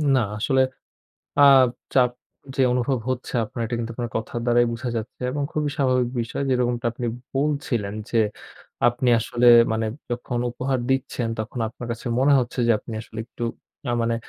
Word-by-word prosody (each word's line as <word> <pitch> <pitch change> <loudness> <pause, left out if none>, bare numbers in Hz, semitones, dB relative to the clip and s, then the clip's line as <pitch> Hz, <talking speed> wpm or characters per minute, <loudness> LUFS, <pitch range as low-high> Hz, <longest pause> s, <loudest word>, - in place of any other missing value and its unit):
না, - - +4 0.2
আসলে 130 +4 +2 0.8
আ 145 - +7 0.5
চাপ 125 -2 +5 0.5
যে - - +1
অনুভব 125 +1 +1
হচ্ছে 130 -1 -3
আপনার, 115 +2 -5
এটা 120 - -3
কিন্তু 115 0 -3
আপনার 120 0 -4
কথার 110 +1 -3
দ্বারাই 120 0 +4
বুঝা 120 +2 -4
যাচ্ছে। 110 +2 -6
এবং 145 +2 -2
খুবই 150 -1 0
স্বাভাবিক 130 -3 +2
বিষয় 115 +4 -3
যেরকমটা 125 -1 +1
আপনি 120 0 -4 0.3
বলছিলেন 135 -8 -1 0.2
যে, 115 - +2 0.7
আপনি 120 +1 0
আসলে 120 +2 0 0.3
মানে 110 0 0 0.2
যখন 120 0 -3
উপহার 130 +2 -1
দিচ্ছেন, 130 -3 0
তখন 110 +3 -4
আপনার 120 +1 -9
কাছে 120 - -9
মনে 140 +2 +4
হচ্ছে 125 +1 -5
যে, 115 - +3
আপনি 115 - -9
আসলে 110 - -11
একটু, 120 - -10 0.4
না - - -1
মানে 115 0 +1
120 Hz, 170 wpm, -24 LUFS, 115-130 Hz, 0.8 s, আ